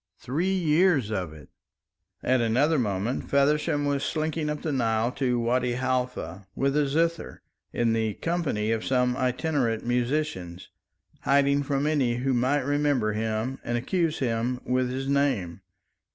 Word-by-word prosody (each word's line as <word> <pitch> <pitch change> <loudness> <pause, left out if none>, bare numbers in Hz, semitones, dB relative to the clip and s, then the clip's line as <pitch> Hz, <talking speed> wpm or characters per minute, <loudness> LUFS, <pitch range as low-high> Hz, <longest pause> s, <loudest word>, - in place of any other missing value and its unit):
Three 165 +9 -1
years 160 - +2
of 90 -6 -2
it!" 75 -2 -13 0.7
At 130 -1 +2
another 135 +7 +2
moment 105 +2 -2
Feversham 145 +1 +2
was 140 -1 0
slinking 155 0 -1
up 150 0 -4
the 155 - -1
Nile 115 -3 +1
to 125 -2 0
Wadi 120 +1 +1
Halfa 125 -8 -2
with 135 +1 0
a 150 -1 +2
zither, 165 +4 -1 0.3
in 115 -1 +1
the 110 -2 0
company 160 -11 -1
of 115 -1 -1
some 125 -1 +1
itinerant 130 -3 0
musicians, 120 - -2 0.5
hiding 140 0 +3
from 140 0 -1
any 140 -6 +1
who 130 +2 0
might 130 +4 +2
remember 145 -6 +1
him 110 +4 -2
and 120 0 -1
accuse 165 +5 0
him 120 0 -1
with 125 0 +1
his 135 +1 -3
name. 130 -11 0
130 Hz, 145 wpm, -26 LUFS, 115-145 Hz, 0.7 s, hiding